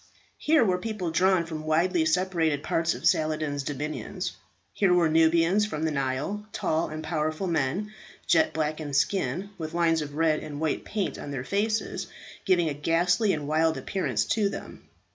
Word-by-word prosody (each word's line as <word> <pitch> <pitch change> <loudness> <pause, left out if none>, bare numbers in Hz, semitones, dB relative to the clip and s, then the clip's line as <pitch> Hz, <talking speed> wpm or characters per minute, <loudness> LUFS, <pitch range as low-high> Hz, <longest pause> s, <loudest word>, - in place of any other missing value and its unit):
Here 305 -6 +4
were 180 -3 +1
people 200 -4 -3
drawn 180 +1 +3
from 160 -2 -6
widely 165 +2 +2
separated 160 -3 +1
parts 165 +1 0
of - - -8
Saladin's 155 -2 +1
dominions. 150 +2 -4 0.4
Here 195 -3 +2
were 175 -2 +4
Nubians 165 +5 +3
from 155 -6 -4
the 160 - +1
Nile, 140 +9 -2
tall 160 -3 -1
and 155 +1 -6
powerful 155 +2 -2
men, 170 +6 -1 0.3
jet 315 -1 +3
black 155 0 -2
in 145 -2 -4
skin, 180 +4 0
with 160 0 -5
lines 165 -2 +2
of 145 -1 -6
red 155 -1 +2
and 145 -1 -7
white 160 -1 -1
paint 205 -2 -3
on - - -7
their 135 -3 -4
faces, 215 +7 -1 0.4
giving 175 -4 +3
a 150 - -1
ghastly 175 +7 +2
and 150 -4 -3
wild 160 +1 +2
appearance 195 -2 -1
to 210 -3 +1
them. - - -9
165 Hz, 170 wpm, -27 LUFS, 155-185 Hz, 0.4 s, Here